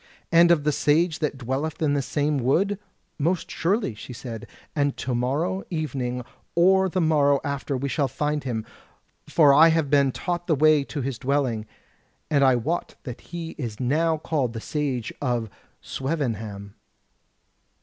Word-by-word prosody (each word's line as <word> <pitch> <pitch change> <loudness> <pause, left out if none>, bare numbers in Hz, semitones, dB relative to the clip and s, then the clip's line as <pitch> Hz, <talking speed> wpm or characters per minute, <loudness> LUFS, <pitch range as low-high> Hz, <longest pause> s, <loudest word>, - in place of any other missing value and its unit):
"And 170 +1 +6
of 165 -4 +4
the 150 - +2
Sage 155 +3 +2
that 150 -3 -1
dwelleth 135 +5 -3
in 150 -3 +1
this 140 -2 -1
same 145 -1 0
wood?" 190 +11 +1 0.4
"Most 170 +5 0
surely," 190 - 0
she 115 +4 -9
said, 115 -2 -7 0.3
"and 145 -2 0
to 130 - -3
morrow 150 +11 -1
evening 130 -7 -3 0.3
or 190 +2 +4
the 185 - -1
morrow 145 -4 +3
after 140 -1 -2
we 140 +2 -2
shall 140 0 0
find 150 +3 -2
him; 115 -4 -3 0.6
for 145 -4 +6
I 155 +4 +8
have 160 -3 +1
been 140 -2 +4
taught 175 +4 -3
the 160 - +3
way 155 0 +4
to 145 - -4
his 130 -2 -3
dwelling; 125 -5 0 0.6
and 140 -2 +4
I 130 -2 +5
wot 155 +9 -2
that 125 -3 -7
he 165 -1 -6
is 115 -6 -5
now 160 +6 +1
called 145 -6 -1
the 115 - -4
Sage 135 -3 -3
of 120 -6 -1 0.3
Swevenham. 110 -9 -3
145 Hz, 160 wpm, -25 LUFS, 125-160 Hz, 0.6 s, I